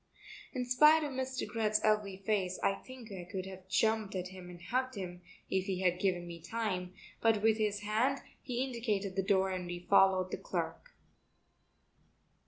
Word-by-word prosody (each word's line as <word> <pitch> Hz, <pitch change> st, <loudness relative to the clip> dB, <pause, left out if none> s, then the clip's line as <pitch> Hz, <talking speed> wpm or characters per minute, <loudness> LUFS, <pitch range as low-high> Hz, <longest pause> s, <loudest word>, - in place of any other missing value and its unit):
In 250 Hz, -2 st, -2 dB
spite 300 Hz, +6 st, +6 dB
of 295 Hz, -, -2 dB
Mr. 260 Hz, 0 st, -3 dB
Greth's 215 Hz, -2 st, +1 dB
ugly 210 Hz, -3 st, +2 dB
face 190 Hz, -2 st, 0 dB
I 195 Hz, -, +4 dB
think 245 Hz, +1 st, -11 dB
I 185 Hz, -2 st, -6 dB
could 190 Hz, -2 st, -3 dB
have 190 Hz, -1 st, -10 dB
jumped 220 Hz, +1 st, +1 dB
at 180 Hz, -1 st, -3 dB
him 185 Hz, -1 st, -10 dB
and 175 Hz, -1 st, -10 dB
hugged 255 Hz, +8 st, -1 dB
him 180 Hz, -3 st, -6 dB, 0.3 s
if 190 Hz, -1 st, 0 dB
he 190 Hz, -1 st, -2 dB
had 180 Hz, -1 st, +2 dB
given 180 Hz, -2 st, +1 dB
me 170 Hz, -1 st, -8 dB
time, 185 Hz, -4 st, -3 dB, 0.3 s
but 225 Hz, -2 st, +3 dB
with 220 Hz, 0 st, +4 dB
his 210 Hz, -1 st, 0 dB
hand 225 Hz, +7 st, +1 dB, 0.2 s
he 250 Hz, -1 st, -1 dB
indicated 215 Hz, -7 st, -2 dB
the 195 Hz, -, +2 dB
door 190 Hz, -1 st, +2 dB
and 185 Hz, -1 st, -3 dB
we 175 Hz, 0 st, -6 dB
followed 190 Hz, -2 st, +5 dB
the -, -, -2 dB
clerk. -, -, -4 dB
200 Hz, 180 wpm, -33 LUFS, 185-230 Hz, 0.3 s, spite